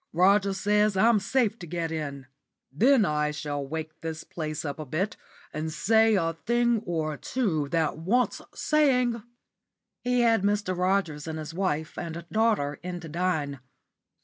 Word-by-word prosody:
Rogers 195 +2 +3
says 210 0 +2
I'm 220 +2 +5
safe 230 +1 0
to 175 - -8
get 165 0 -3
in. 140 -4 -4 0.5
Then 235 - +4
I 150 -2 +1
shall 145 -1 -3
wake 155 +2 -6
this 160 -1 -5
place 155 -1 -5
up 145 +1 -4
a 155 - -5
bit, 185 +10 -1 0.4
and 155 +1 -3
say 220 +6 +3
a 165 -3 +1
thing 235 +5 +1
or 160 -3 -1
two 170 - -1
that 160 -2 0
wants 230 +10 +1
saying." 250 -6 +2 0.8
He 250 0 +2
had 225 -3 +4
Mr. 200 -2 0
Rogers 180 -5 0
and 160 0 -4
his 155 0 -6
wife 160 -4 -2
and 170 0 -6
daughter 215 -11 +1
in 180 0 -5
to 165 - -8
dine. 155 -5 -1
175 Hz, 155 wpm, -27 LUFS, 155-215 Hz, 0.8 s, I'm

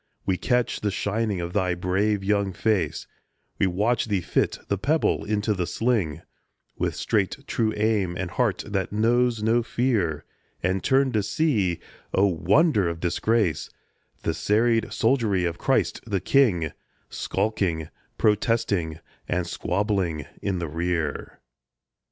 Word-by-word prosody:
We 95 - +1
catch 125 +5 0
the 105 - +1
shining 105 0 -1
of 85 +1 -5
thy 95 -3 +1
brave 95 +3 0
young 100 -1 +1
face, 95 -9 0 0.5
We 100 - +3
watch 105 +6 +1
thee 105 -4 0
fit - - 0
the 100 - -1
pebble 155 +8 +1
to 105 0 +1
the 90 -3 -2
sling 110 -11 0 0.5
With - - -1
straight, 100 0 0
true 115 -5 0
aim 105 -5 +1
and 95 -2 -3
heart 115 0 0
that 100 -2 -2
knows 115 +1 +2
no 115 +2 +3
fear, 110 - 0 0.4
And 95 +2 0
turn 135 0 +3
to 110 -3 +1
see, 105 - +1 0.4
O 95 - +5
wonder 100 - +3
of 85 0 -5
disgrace, 90 0 0 0.5
The - - 0
serried 115 +2 +1
soldiery 110 -7 +2
of 85 -1 -3
Christ - - +1
the 100 -3 0
King 90 - +3 0.4
Skulking, 85 -7 -1 0.3
protesting, 105 -6 +1 0.5
squabbling 90 -3 -1 0.2
in 100 -2 -1
the 85 -1 -3
rear! 80 -1 -3
100 Hz, 135 wpm, -25 LUFS, 90-115 Hz, 0.5 s, O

